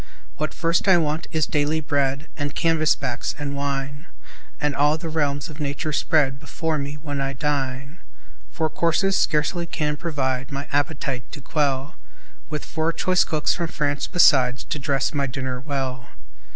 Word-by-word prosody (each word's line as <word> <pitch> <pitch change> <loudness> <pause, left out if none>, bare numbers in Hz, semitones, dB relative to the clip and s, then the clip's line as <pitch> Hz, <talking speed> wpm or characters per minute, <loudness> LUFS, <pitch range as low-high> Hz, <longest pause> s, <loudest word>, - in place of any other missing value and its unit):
What 155 - -1
first 170 +3 +1
I 190 -2 +7
want 155 -1 0
is 155 -2 +2
daily 150 +1 +1
bread 140 0 0
And 145 -1 -3
canvas 165 -2 +3
backs, 125 -4 -3
and 145 -1 -3
wine 140 +2 -3 0.5
And 150 -2 0
all 150 +2 +3
the 165 0 -5
realms 145 -1 0
of 155 -2 -11
nature 150 +1 -2
spread 140 -3 +2
Before 155 +1 -2
me, 140 +1 -4
when 145 -2 -4
I 135 0 -1
dine. 140 +2 -2 0.5
Four 160 -1 -1
courses 180 +4 +2
scarcely 170 +1 +1
can 150 -2 -1
provide 135 -6 -2
My 140 +1 -4
appetite 140 -3 -1
to 150 - -6
quell; 140 -1 -1 0.5
With 150 -2 -4
four 160 0 0
choice 185 +2 +3
cooks 155 -2 +1
from 170 - -2
France 145 -2 -1
beside, 130 -7 +5 0.2
To 150 - -4
dress 135 0 0
my 140 -2 0
dinner 130 -1 -3
well. 130 -3 -3
145 Hz, 165 wpm, -24 LUFS, 140-160 Hz, 0.5 s, I